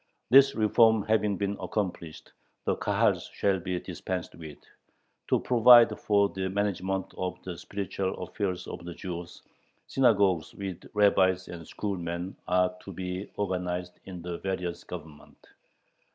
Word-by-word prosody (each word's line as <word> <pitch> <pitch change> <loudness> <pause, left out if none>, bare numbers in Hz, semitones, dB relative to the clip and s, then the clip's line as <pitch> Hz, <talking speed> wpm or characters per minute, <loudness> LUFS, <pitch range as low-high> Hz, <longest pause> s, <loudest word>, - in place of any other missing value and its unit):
This 135 +1 +7
reform 110 0 +4
having 105 -2 +1
been 100 +1 -1
accomplished, 90 -6 -4 0.3
the - - +1
Kahals - - +1
shall 95 -1 +1
be 90 0 -3
dispensed 90 -1 -5
with. 80 -3 -10 0.7
To - - +3
provide 120 -2 +7
for 100 -1 +3
the 95 0 -3
management 95 -1 -2
of 90 0 -3
the 90 -2 -5
spiritual 95 +1 -4
affairs 90 0 -3
of 85 - -8
the 85 -1 -7
Jews, 90 -2 -7 0.4
"synagogues," 100 -9 +2
with 95 -3 -7
rabbis 95 -3 +3
and 85 -2 -8
"schoolmen," 90 -2 -4
are 90 0 +2
to 95 - -9
be 90 +1 -5
organized 90 -2 -3
in 90 -3 -8
the 85 -1 -5
various 90 -2 -3
Governments. 80 -4 -11
95 Hz, 135 wpm, -28 LUFS, 90-100 Hz, 0.7 s, This